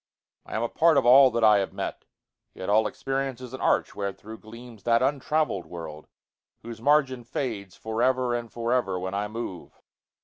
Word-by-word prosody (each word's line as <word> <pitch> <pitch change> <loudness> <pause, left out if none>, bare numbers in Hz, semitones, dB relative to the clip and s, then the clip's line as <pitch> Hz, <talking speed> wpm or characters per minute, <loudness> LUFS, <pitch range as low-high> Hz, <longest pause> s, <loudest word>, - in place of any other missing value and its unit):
I - - -6
am 110 - 0
a - - +1
part 160 +4 +3
of 135 - +3
all 130 +2 +8
that 115 -1 -1
I 105 -2 +6
have 95 - -3
met; - - -5 0.5
Yet 95 - -6
all 110 +1 +4
experience 135 -2 -3
is 125 -1 -10
an 130 - -7
arch - - +2
wherethro'Gleams 110 +3 -8
that 115 +3 +2
untravell'd 145 - 0
world, 80 -3 -8 0.6
whose 115 -1 -8
margin 135 -2 +2
fadesFor 110 -2 -4
ever 130 -1 +2
and 120 -1 -4
for 120 +1 -2
ever 100 -8 0
when 95 +1 -4
I 100 +1 -1
move. 105 -4 -7
115 Hz, 175 wpm, -26 LUFS, 105-130 Hz, 0.6 s, all